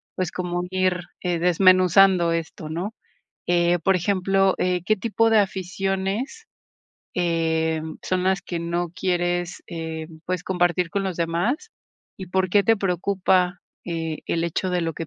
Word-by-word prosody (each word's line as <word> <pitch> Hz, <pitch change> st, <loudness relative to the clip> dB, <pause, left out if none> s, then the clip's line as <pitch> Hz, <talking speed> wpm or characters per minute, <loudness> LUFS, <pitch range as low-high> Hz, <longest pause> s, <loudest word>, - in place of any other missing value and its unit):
pues, 185 Hz, -1 st, -2 dB
como 175 Hz, -1 st, -3 dB
ir, 185 Hz, -1 st, +1 dB, 0.2 s
eh, 175 Hz, -2 st, -1 dB
desmenuzando 185 Hz, 0 st, +5 dB
esto, 165 Hz, -1 st, -4 dB
¿no?, 180 Hz, +7 st, -4 dB, 0.5 s
eh, 175 Hz, 0 st, +3 dB
por 190 Hz, +3 st, +2 dB
ejemplo, 195 Hz, +1 st, +2 dB
eh, 180 Hz, -1 st, +1 dB
¿qué 215 Hz, -, +3 dB
tipo 225 Hz, +2 st, +1 dB
de 220 Hz, -1 st, +5 dB
aficiones, 195 Hz, -, -2 dB, 0.7 s
em, 160 Hz, -2 st, 0 dB
son 185 Hz, -1 st, -1 dB
las 190 Hz, 0 st, +1 dB
que 175 Hz, -, -4 dB
no 170 Hz, 0 st, -2 dB
quieres, 175 Hz, 0 st, -1 dB
eh, 160 Hz, -2 st, -5 dB, 0.2 s
pues, 180 Hz, -1 st, -2 dB
compartir 175 Hz, -1 st, +1 dB
con 200 Hz, -1 st, -1 dB
los 185 Hz, -3 st, -3 dB
demás? 175 Hz, -, -1 dB, 0.5 s
¿Y 190 Hz, -, -7 dB
por 185 Hz, 0 st, +1 dB
qué 200 Hz, +1 st, +5 dB
te 225 Hz, +2 st, +4 dB
preocupa, 185 Hz, -1 st, +1 dB, 0.2 s
eh, 165 Hz, -2 st, -3 dB
el 165 Hz, -, 0 dB
hecho 170 Hz, +2 st, -1 dB
de 180 Hz, -, +1 dB
lo 165 Hz, -1 st, -2 dB
que 165 Hz, -, -5 dB
180 Hz, 150 wpm, -23 LUFS, 170-190 Hz, 0.7 s, desmenuzando